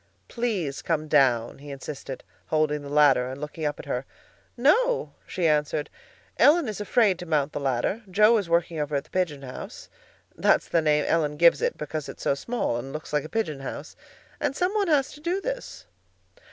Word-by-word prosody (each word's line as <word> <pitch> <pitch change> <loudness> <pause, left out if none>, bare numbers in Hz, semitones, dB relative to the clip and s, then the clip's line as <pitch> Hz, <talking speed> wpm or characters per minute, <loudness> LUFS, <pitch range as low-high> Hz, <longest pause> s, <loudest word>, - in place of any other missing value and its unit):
"Please 205 - -2
come 155 -2 -1
down," 130 -6 +2
he 145 +1 -11
insisted, 135 -1 -7 0.2
holding 155 -1 +1
the 140 - -8
ladder 140 -4 +4
and 130 +1 -7
looking 150 +1 -5
up 145 -1 -1
at - - -8
her. 125 - -2 0.5
"No," 470 - +2
she 180 -3 -2
answered; 150 -1 0 0.5
"Ellen 310 -1 +5
is 210 -1 -4
afraid 205 -3 +2
to 175 - -7
mount 150 -2 0
the - - -3
ladder. 135 - -1
Joe 210 +5 +5
is 190 -5 -5
working 170 -1 +1
over 150 0 -2
at 140 - 0
the - - -26
'pigeon 160 -7 -1
house'—that's 130 -1 -3
the 165 - +3
name 150 -1 +2
Ellen 150 -3 +1
gives 170 +2 +5
it, - - 0
because 150 0 -5
it's - - -9
so - - +2
small 140 - -2
and 130 +3 -6
looks 155 0 -7
like 150 -1 +1
a - - -8
pigeon 185 -11 -2
house—and 135 - -7
some 360 +5 0
one 415 -3 +1
has 285 -4 +2
to 295 - -12
do 350 +4 -1
this." - - -6
155 Hz, 190 wpm, -26 LUFS, 145-215 Hz, 0.5 s, Ellen